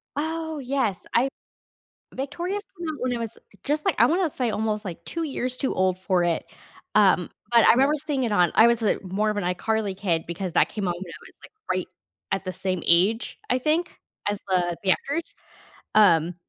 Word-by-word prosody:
Oh, 320 +1 -3
yes, 250 -8 -1
I 255 +3 +3 0.8
Victorious 345 +9 -3
came 345 -2 -5
out 310 - -3
when 250 -1 -1
I 235 - -3
was 230 -1 -5 0.2
just, 300 +2 -1
like, - - +2
I - - +6
wanna 350 +1 +2
say 250 -5 -1
almost, 215 0 -2
like, 175 -3 -7
2 335 0 -4
years 255 -4 -3
too 265 - -1
old 185 -1 +1
for 185 -1 +1
it, 170 -2 0 0.5
um, 190 -4 +4 0.2
but 235 -1 +6
I - - +8
remember 270 +5 +4
seeing 275 -4 0
it 235 - -1
on 180 -5 +3
I 225 - +7
was, 235 -1 +2
uh, 210 - +3
more 205 +4 0
of 210 - -4
an 205 - -1
iCarly 195 +2 -1
kid 170 -5 0
because 175 +1 -4
that - - +4
came 205 -3 -3
out 175 - +1
when 175 +2 -7
I 170 - -9
was, - - -17
like, - - -13 0.2
right 185 -1 -1 0.4
at 195 - -1
the 185 - -3
same 185 -3 -2
age, 190 +7 +3
I 250 - +3
think, 315 +6 0 0.3
as 205 -1 -2
the 175 -2 +1
the 190 - +4
actors, 295 - -2 0.6
um, 175 -5 +5
215 Hz, 205 wpm, -25 LUFS, 185-275 Hz, 0.8 s, I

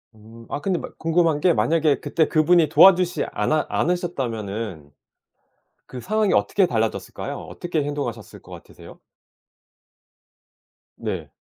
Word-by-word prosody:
음. 110 +2 -15
아 - - -3
근데 185 +3 -1
막 - - -10
궁금한 165 -2 +1
게 175 +3 +3
만약에 155 -3 +1
그때 160 -2 0
그분이 160 +1 +3
도와주시지 180 +1 +5
않아 155 0 0
않으셨다면은 115 - -3 1.0
그 125 - -8
상황이 215 - 0
어떻게 195 -2 +2
달라졌을까요? 115 -7 -3
어떻게 170 -4 -4
행동하셨을 140 -7 -5
것 - - -17
같으세요? - - -13 2.0
네. - - -5
155 Hz, 300 characters per minute, -22 LUFS, 115-175 Hz, 2.0 s, 도와주시지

